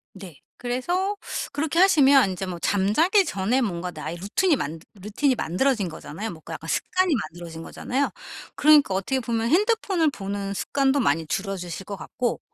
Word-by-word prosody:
네. 185 Hz, -7 st, -11 dB, 0.2 s
그래서 350 Hz, +12 st, -1 dB, 0.4 s
그렇게 315 Hz, +3 st, -1 dB
하시면 280 Hz, -, +6 dB
인제 185 Hz, +1 st, -4 dB
뭐 175 Hz, -2 st, -6 dB
잠자기 310 Hz, -, +3 dB
전에 220 Hz, -, 0 dB
뭔가 180 Hz, -5 st, -2 dB
나의 155 Hz, +1 st, -6 dB
루틴이 290 Hz, -, +1 dB
만 160 Hz, -, -4 dB
루틴이 215 Hz, +7 st, 0 dB
만들어진 210 Hz, +2 st, 0 dB
거잖아요. 180 Hz, +6 st, -7 dB
뭔가 160 Hz, -4 st, -9 dB
약간 -, -, -8 dB
습관이 370 Hz, -2 st, +1 dB
만들어진 170 Hz, -4 st, -6 dB
거잖아요. 265 Hz, +10 st, -2 dB, 0.5 s
그러니까 295 Hz, -9 st, +5 dB
어떻게 230 Hz, +8 st, -1 dB
보면 230 Hz, -1 st, -1 dB
핸드폰을 385 Hz, -, +2 dB
보는 200 Hz, -2 st, -4 dB
습관도 275 Hz, +6 st, +1 dB
많이 165 Hz, -, +1 dB
줄어드실 190 Hz, +1 st, -4 dB
것 200 Hz, -1 st, -6 dB
같고 245 Hz, -1 st, -3 dB
225 Hz, 380 characters per minute, -24 LUFS, 185-285 Hz, 0.5 s, 하시면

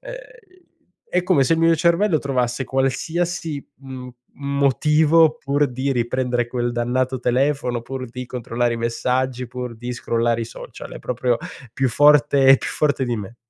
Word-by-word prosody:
ehm, -, -, -8 dB, 1.0 s
è 180 Hz, 0 st, +1 dB
come 175 Hz, -7 st, +3 dB
se 145 Hz, -, +2 dB
il -, -, -2 dB
mio 165 Hz, 0 st, +5 dB
cervello 170 Hz, +1 st, +2 dB
trovasse 130 Hz, -2 st, -1 dB
qualsiasi 155 Hz, +4 st, -2 dB, 0.2 s
m 130 Hz, -1 st, -8 dB, 0.3 s
motivo 150 Hz, +3 st, +3 dB
pur 140 Hz, +2 st, +1 dB
di 130 Hz, +3 st, -2 dB
riprendere 120 Hz, -1 st, 0 dB
quel 120 Hz, 0 st, -2 dB
dannato 125 Hz, +2 st, -1 dB
telefono, 125 Hz, -1 st, 0 dB
pur 130 Hz, +1 st, -6 dB
di 125 Hz, +2 st, -7 dB
controllare 120 Hz, -1 st, -2 dB
i -, -, -4 dB
messaggi, 125 Hz, +2 st, -1 dB
pur 125 Hz, -2 st, -6 dB
di 125 Hz, +2 st, -5 dB
scrollare 115 Hz, -1 st, 0 dB
i -, -, -2 dB
social. 115 Hz, -, -10 dB
È -, -, -8 dB
proprio 125 Hz, -1 st, 0 dB, 0.4 s
più 130 Hz, +1 st, 0 dB
forte 145 Hz, +1 st, +4 dB
è 135 Hz, 0 st, +9 dB
più -, -, -5 dB
forte 140 Hz, -3 st, 0 dB
di 120 Hz, -2 st, -2 dB
me. 105 Hz, +3 st, -7 dB
130 Hz, 160 wpm, -21 LUFS, 120-145 Hz, 1.0 s, è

